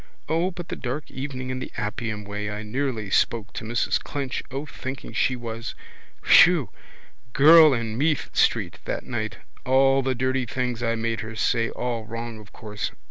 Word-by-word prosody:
O 165 +3 +1
but 175 -2 -8
the - - -3
dark 135 +4 -5
evening 130 -1 -5
in 130 - -3
the - - -6
Appian 110 0 -3
way 105 0 -4
I 105 +1 -5
nearly 115 -3 -3
spoke 115 -1 +1
to - - -5
Mrs 115 +2 0
Clinch 135 -3 -3
O 135 +3 -4
thinking 130 -2 -7
she 130 - +1
was. 115 -1 -6 0.5
Whew! 165 - +6 0.6
Girl 155 +2 +8
in 115 -2 -3
Meath 155 0 0
street - - +2
that - - -3
night. 110 -3 -3 0.3
All 135 +1 +4
the 130 0 0
dirty 130 0 0
things 125 0 -2
I 115 -1 +1
made 115 0 -2
her 110 -2 -6
say. 115 +1 +1
All 120 -3 -3
wrong 115 0 -6
of 105 -1 -14
course. 105 -1 -5
125 Hz, 175 wpm, -25 LUFS, 110-135 Hz, 0.6 s, Girl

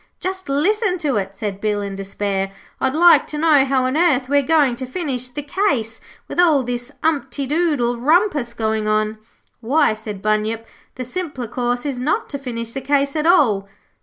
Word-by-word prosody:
'Just 375 -1 -4
listen 370 +7 +1
to 300 -7 -1
it,' 195 0 -3
said 200 -1 -5
Bill, 210 -1 0
in 200 -1 -4
despair. 195 0 -3 0.3
'I'd 265 +1 0
like 345 +2 +6
to 300 - -5
know 300 -3 +5
how 265 -1 +1
on 255 +2 -1
earth 285 -6 +2
we 285 0 +4
are - - +2
going 290 -3 +3
to 260 - -5
finish 255 -5 -3
the 290 +4 -6
case 275 - -1 0.3
with - - -5
all 315 -6 +4
this 245 +2 -4
umptydoodle 285 -3 0
rumpus 300 - +2
going 220 -1 -1
on.' 215 0 0 0.4
'Why,' 275 +2 +2
said 215 -2 -7
Bunyip, 215 +1 0 0.3
'the 255 - -5
simpler 285 -4 -4
course 245 +2 -2
is 275 -4 -3
not 335 - -1
to 280 - -5
finish 230 -3 -5
the 270 - -4
case 280 +1 +1
at 305 +1 0
all.' 220 - +3
260 Hz, 185 wpm, -20 LUFS, 225-305 Hz, 0.4 s, like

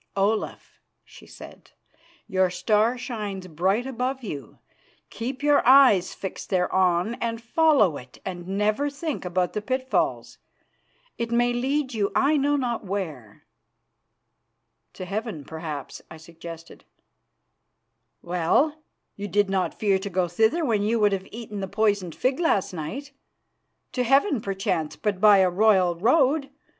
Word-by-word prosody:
"Olaf," 205 +2 -1 0.2
she - - -16
said, - - -13 0.6
"your 190 -1 +1
star 215 +6 +1
shines 210 -6 -5
bright 185 +8 0
above 260 +1 -3
you. 145 - -7 0.5
Keep 255 +5 -5
your 290 -1 +4
eyes 250 -9 +6
fixed 190 - -7
thereon 185 +1 +1
and 230 -1 -2
follow 235 - +3
it, 125 0 -13
and 175 -2 -6
never 210 +8 0
think 285 - -5
about 180 0 -1
the 210 - -2
pitfalls. 260 +3 -1 0.8
It 235 0 -2
may 240 +1 +2
lead 265 +2 -1
you 205 -3 0
I 285 +3 +3
know 290 0 +2
not 245 -5 -2
where." 160 - -6 1.5
"To 185 - -7
heaven, 195 - -4
perhaps," 160 -3 -7
I 160 - -10
suggested. 165 0 -11 1.4
"Well, 180 - +1 0.3
you 205 0 -5
did 205 +1 +1
not 190 -1 -1
fear 200 -3 +2
to 200 +1 -5
go 185 -1 0
thither 220 - +1
when 220 -6 +1
you 225 +3 +1
would 210 -1 +4
have 195 -1 -3
eaten 215 -2 -7
the 195 - -3
poisoned 200 -5 0
fig 260 +3 0
last 210 - +1
night. 220 - -6 0.8
To 250 - -1
heaven, 270 - +3
perchance, 190 -6 -2
but 205 -3 -2
by 210 -2 +7
a 190 -1 +4
royal 190 -2 +4
road. 275 - +2
210 Hz, 140 wpm, -25 LUFS, 185-250 Hz, 1.5 s, by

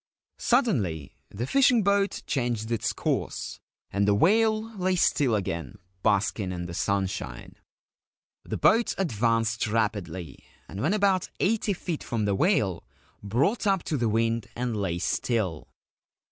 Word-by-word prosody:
Suddenly 110 - +1 0.2
the 115 +5 -4
fishing 250 - +4
boat 200 0 +1
changed 120 -6 -2
its 115 -2 0
course, - - -3 0.3
and 100 +1 +1
the 100 - +4
whale 220 - +2
lay 185 -1 0
still 140 -8 +2
again, 85 - -3 0.2
basking 100 -2 +1
in 90 -1 -4
the 85 - -7
sunshine. 95 -10 -2 0.9
The - - -4
boat 230 +1 +3
advanced 115 - +1
rapidly, 100 -8 -2 0.3
and 95 - -6
when 165 - +2
about 195 -3 +2
eighty 210 +1 +1
feet 175 -3 -4
from 110 -3 -2
the 100 - +1
whale 105 - +1 0.4
brought 140 - 0
up 195 -3 +2
to 150 - -2
the 120 -3 +1
wind 115 0 0
and 120 -1 -2
lay 95 -5 -1
still. 95 -3 -1
115 Hz, 135 wpm, -27 LUFS, -, 0.9 s, fishing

